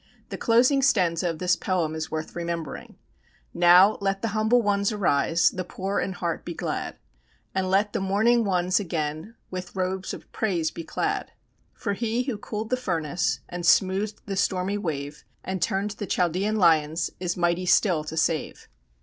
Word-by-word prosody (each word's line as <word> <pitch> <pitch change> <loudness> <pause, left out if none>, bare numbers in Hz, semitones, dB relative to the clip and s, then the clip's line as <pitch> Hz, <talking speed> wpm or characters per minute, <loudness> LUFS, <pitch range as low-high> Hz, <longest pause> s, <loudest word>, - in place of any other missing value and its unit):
The - - -5
closing 250 +4 +4
stanza 180 -9 +2
of 165 - -4
this 180 +1 +2
poem 175 -5 -1
is 160 0 -4
worth 155 0 -5
remembering: 170 -2 -5 0.6
"Now, 180 +4 +6
let 195 +1 -1
the 225 - 0
humble 220 +3 +2
ones 200 0 +1
arise, 165 -5 +2
The 185 - -4
poor 195 +2 -3
in 190 - -2
heart 170 -2 -3
be 170 - -6
glad, - - -4 0.6
And 190 -1 -1
let 200 +2 +2
the - - 0
mourning 215 +5 +3
ones 185 -2 +1
again 160 +2 -4 0.2
With 185 0 -6
robes 185 0 -2
of - - -10
praise 175 -7 -1
be 165 - -7
clad; - - -2 0.4
For 205 -4 -2
He 230 +3 -1
who 250 -5 -4
cooled 215 +2 -5
the 255 - +2
furnace, 175 - -1
And 175 0 -6
smoothed 195 +4 +2
the 195 - -4
stormy 195 +1 0
wave, 150 -5 -4 0.2
And 190 -1 -4
turned 195 +5 0
the 205 0 -6
Chaldean 185 +6 0
lions, 160 -4 +3
Is 180 -1 -2
mighty 175 +1 0
still 180 -3 +3
to 160 +1 -6
save." 160 -1 -1
185 Hz, 170 wpm, -25 LUFS, 170-205 Hz, 0.6 s, Now